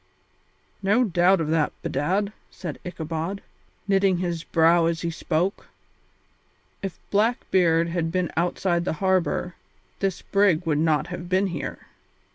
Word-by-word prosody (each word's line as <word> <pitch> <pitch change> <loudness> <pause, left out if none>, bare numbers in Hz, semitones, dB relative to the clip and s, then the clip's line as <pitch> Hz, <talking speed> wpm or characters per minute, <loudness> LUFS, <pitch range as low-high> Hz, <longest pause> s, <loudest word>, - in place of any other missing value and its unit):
"No 205 +6 +3
doubt 185 -2 +3
of 160 -2 -1
that, 155 -2 +2
bedad," 190 +9 0 0.2
said 170 -6 -7
Ichabod, 170 +2 -4 0.4
knitting 195 -2 +3
his 170 -2 -2
brows 165 +1 +4
as 165 -2 -3
he 170 - -2
spoke; 170 +3 -1 1.1
"if 195 -2 -5
Blackbeard 185 -6 +2
had 165 -1 -1
been 180 -1 -1
outside 175 +1 0
the 175 - -1
harbour, 180 0 0 0.5
this 195 -3 -1
brig 195 -4 +2
would 150 -2 +1
not 160 +1 +1
have 175 0 -6
been 190 +2 +2
here." 155 - -5
175 Hz, 130 wpm, -25 LUFS, 165-190 Hz, 1.1 s, brows